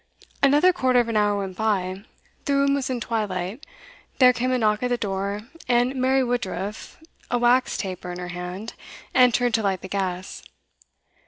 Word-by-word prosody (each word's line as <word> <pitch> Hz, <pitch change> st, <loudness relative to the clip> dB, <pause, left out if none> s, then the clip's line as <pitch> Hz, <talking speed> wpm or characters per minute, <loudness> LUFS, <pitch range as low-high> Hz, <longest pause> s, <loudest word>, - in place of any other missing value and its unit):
Another 295 Hz, +6 st, +5 dB
quarter 255 Hz, -6 st, +2 dB
of 235 Hz, -1 st, +1 dB
an 225 Hz, -, -2 dB
hour 205 Hz, -1 st, +2 dB
went 195 Hz, -2 st, -4 dB
by. 190 Hz, -3 st, -1 dB, 0.4 s
The 280 Hz, -, +1 dB
room 280 Hz, 0 st, +3 dB
was 280 Hz, -2 st, -1 dB
in 255 Hz, -2 st, -2 dB
twilight. 210 Hz, -, -3 dB, 0.5 s
There 250 Hz, -1 st, +7 dB
came 250 Hz, +1 st, -1 dB
a 255 Hz, -, +2 dB
knock 215 Hz, -2 st, +1 dB
at 250 Hz, -, +1 dB
the 245 Hz, -, +1 dB
door, 200 Hz, -1 st, -3 dB, 0.3 s
and 245 Hz, +1 st, +2 dB
Mary 260 Hz, +1 st, +2 dB
Woodruff, 210 Hz, -5 st, -4 dB, 0.3 s
a 245 Hz, -, +1 dB
wax 245 Hz, +2 st, +2 dB
taper 185 Hz, -2 st, -5 dB
in 175 Hz, -, -6 dB
her 180 Hz, 0 st, -6 dB
hand, 180 Hz, +5 st, -6 dB, 0.4 s
entered 245 Hz, -1 st, +4 dB
to 225 Hz, -, +2 dB
light 195 Hz, -3 st, -1 dB
the -, -, -7 dB
gas. 185 Hz, -2 st, -3 dB
220 Hz, 175 wpm, -24 LUFS, 190-250 Hz, 0.5 s, There